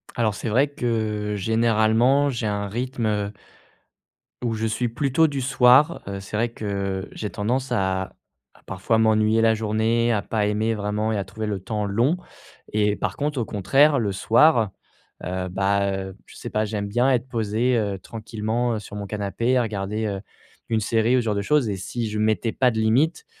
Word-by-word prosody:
Alors, 110 -3 +1
c'est 110 - -4
vrai 130 +7 +3
que 110 -6 -2
généralement 115 +6 +3
j'ai 120 -3 -3
un 100 -1 -2
rythme, 120 +2 -3
heu 105 0 -1 1.1
où 115 -2 -1
je 110 +1 -2
suis 115 +2 -1
plutôt 145 +6 +2
du 140 -2 -3
soir, 130 +2 +4
heu, 100 0 -4
c'est 95 +2 -8
vrai 115 +2 +1
que 100 -3 -3
j'ai 105 - -5
tendance 125 +5 -2
à 95 -4 -1 0.4
à - - -22
parfois 95 +4 -1
m'ennuyer 110 0 +3
la 115 0 +4
journée, 110 +2 +1
à 105 - +1
pas 105 -1 -1
aimer 110 +2 0
vraiment 105 +1 -1
et 105 - 0
à 100 - -1
trouver 105 +3 -6
le 100 -2 -2
temps 105 +2 -3
long 120 - +1 0.5
et 105 -1 +1
par - - -3
contre 145 -2 -1
au 115 - -1
contraire 140 +9 +3
le 105 -3 -1
soir, 115 +3 +4 0.5
heu, 90 +1 -3
bah, 100 +1 +1
heu, 95 -1 -5
je - - -15
sais - - -7
pas, 105 0 +1
j'aime 105 -1 -3
bien 120 +6 +2
être 125 0 +1
posé, 115 +2 0
heu, 100 -3 -1
tranquillement, 115 +2 -3
heu, 110 - -3
sur 100 0 -10
mon 100 -1 -5
canapé, 105 +5 -1
à 125 - +3
regarder, 105 0 -3
heu, 100 -2 -3 0.5
une 115 -1 +1
série 115 +3 +2
ou - - +4
ce - - -7
genre 105 - +1
de 100 - 0
choses 140 +3 +2
et 100 - -2
si 110 +5 -4
je 105 - -3
mettais 110 +1 +1
pas 130 - +2
de 110 - -5
limite, 130 +10 +2
110 Hz, 195 wpm, -23 LUFS, 105-120 Hz, 1.1 s, soir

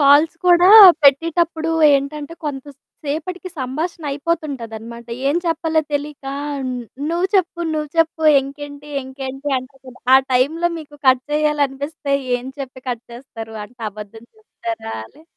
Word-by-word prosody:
Calls 290 +3 +5
కూడా 350 0 +6 0.4
పెట్టేటప్పుడు 330 +3 +3 0.2
ఏంటంటే, 290 +3 -3
కొంత 275 -2 -4 0.4
సేపటికి 355 +6 -4
సంభాషణ 305 +6 -4
అయిపోతుంటదనమాట. 240 -7 -4 0.2
ఏం 290 - +1
చెప్పాలో 320 -1 +1
తెలీక 290 0 -3 0.9
నువ్వు 345 +3 +1
చెప్పు, 360 -2 +1
నువ్వు 305 -1 -2
చెప్పు, 320 0 +1 0.2
ఇంకేంటి? 285 +1 -9
ఇంకేంటి? 265 +2 -6
అంటే 255 +2 -12 0.4
ఆ - - +10 0.2
టైంలో 315 +7 +2
మీకు 295 -1 -12
కట్ 255 -1 +5
చేయాలనిపిస్తే 290 -1 0 0.2
ఏం 245 +1 -8
చెప్పి 260 -1 -7
కట్ 240 -1 -4
చేస్తారు? 225 -3 -9
అంటే 240 +3 -19
అబద్ధం 215 +2 -11
చెప్తారా 345 - -6
అని? 305 - -18
290 Hz, 120 wpm, -19 LUFS, 260-320 Hz, 0.9 s, ఆ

